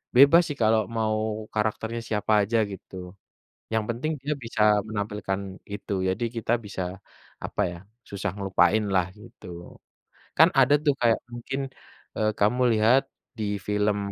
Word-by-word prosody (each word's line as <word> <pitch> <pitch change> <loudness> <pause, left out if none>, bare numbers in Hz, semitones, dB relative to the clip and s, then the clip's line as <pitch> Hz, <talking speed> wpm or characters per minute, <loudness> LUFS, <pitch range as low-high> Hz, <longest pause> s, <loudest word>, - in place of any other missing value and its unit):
bebas 140 +6 +8
sih, 145 - -4
kalau 110 0 +4 0.2
mau 110 0 -1
karakternya 110 +2 -2
siapa 110 -1 -2
aja 115 +4 0
gitu. 95 -1 -10 0.8
Yang 110 -1 +1
penting 120 +7 -2
dia 145 +3 -1
bisa 115 -1 -3 0.3
menampilkan 105 -2 -3 0.3
itu. 105 0 -5 0.2
Jadi, 95 +6 -2
kita 115 0 -2
bisa 100 -2 -5 0.6
apa - - -3
ya, 85 - -8 0.3
susah 100 -1 -3
ngelupain 95 +1 +2
lah 90 -2 +3
gitu. 110 -2 -14 0.9
Kan 160 +2 +8
ada 135 +2 +5
tuh 145 -3 +3
kayak 115 -2 +3
mungkin 120 +3 -4 0.6
eee, 110 0 +2
kamu 110 +5 +2 0.2
lihat 115 +5 +5 0.4
di 110 - -2 0.2
film 105 0 +1
110 Hz, 140 wpm, -26 LUFS, 105-120 Hz, 0.9 s, bebas